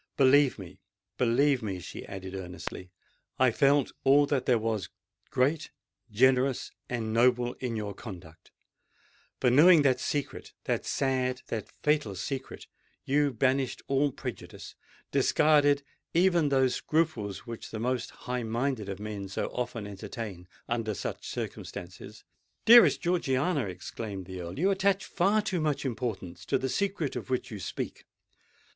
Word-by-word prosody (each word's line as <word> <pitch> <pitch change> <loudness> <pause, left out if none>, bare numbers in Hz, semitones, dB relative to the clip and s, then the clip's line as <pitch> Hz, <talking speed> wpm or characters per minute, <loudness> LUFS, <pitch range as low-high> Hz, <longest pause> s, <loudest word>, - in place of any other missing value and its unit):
Believe 140 0 +5
me—believe 100 +8 -1
me," 100 -4 -4
she - - -8
added 95 -1 -7
earnestly, 90 0 -7 0.5
"I 130 -1 +4
felt 140 +3 +3
all 140 +2 +6
that 135 -3 -1
there 125 - +5
was 110 -3 -2 0.4
great—generous—and 125 -4 0
noble 120 +1 +3
in 125 -3 -3
your 105 -2 -3
conduct: 85 -7 -11 0.9
for, 125 - +3
knowing 155 +4 +7
that 130 -3 +3
secret—that 145 -2 -3
sad, 130 -1 0
that 110 -3 -4
fatal 150 -10 +1
secret—you 135 +4 -3
banished 130 +2 0
all 140 +1 +2
prejudice—discarded 145 +3 0 0.3
even 175 -3 +4
those 130 -2 +3
scruples 150 - -1
which 115 -1 -7
the 110 - -6
most 125 +2 -1
high 125 0 -4
minded 115 -1 -2
of 95 0 -5
men 105 -2 -5
so 100 - -2
often 120 -3 -3
entertain 100 -2 -7 0.2
under 115 -3 -1
such - - -5
circumstances——" 90 +1 -7 0.4
"Dearest 235 +1 +8
Georgiana!" 150 -4 +1
exclaimed 95 +1 -6
the 95 0 -7
Earl; 85 +1 -7
"you 190 +6 +3
attach 195 0 +1
far 205 +4 +2
too 180 -5 -1
much 150 -2 -1
importance 115 -8 -4
to - - +1
the 130 - -2
secret 190 -4 -1
of - - -5
which 130 -2 -2
you 105 - -6
speak. - - -5
125 Hz, 130 wpm, -29 LUFS, 105-145 Hz, 0.9 s, Dearest